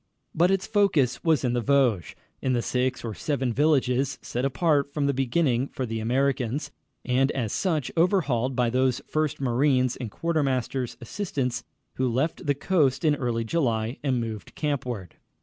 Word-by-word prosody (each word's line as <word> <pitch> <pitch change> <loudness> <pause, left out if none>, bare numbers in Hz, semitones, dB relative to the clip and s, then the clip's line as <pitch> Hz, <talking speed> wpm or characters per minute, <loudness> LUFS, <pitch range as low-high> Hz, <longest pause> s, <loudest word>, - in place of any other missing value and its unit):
But 175 +3 +3
its 195 0 +1
focus 200 - +2
was 160 -4 +2
in 125 -2 +1
the 120 - +1
Vosges, 125 -9 +2 0.3
in 130 - +1
the 120 -1 0
six 125 0 -1
or 110 - -3
seven 130 -1 -1
villages 135 -2 +2
set 125 - -3
apart 140 0 +1
from 145 -1 -1
the 140 - +2
beginning 130 -1 +1
for 130 - -4
the 115 -1 -3
Americans, 135 +3 0 0.3
and 130 +2 +2
as 115 -6 -2
such, 160 -8 0
overhauled 145 - +2
by 120 -2 +1
those 130 0 +1
first 155 -1 -1
marines 130 0 +2
and 120 -4 -5
quartermaster's 135 -4 -1
assistants 125 - -3 0.3
who 130 -1 +1
left 150 +7 -1
the 145 - +3
coast 145 -3 +1
in 150 - +5
early 120 -4 -1
July 115 -3 -1
and 130 -4 0
moved 110 -5 -6
campward. 125 - -3
130 Hz, 165 wpm, -26 LUFS, 120-150 Hz, 0.3 s, in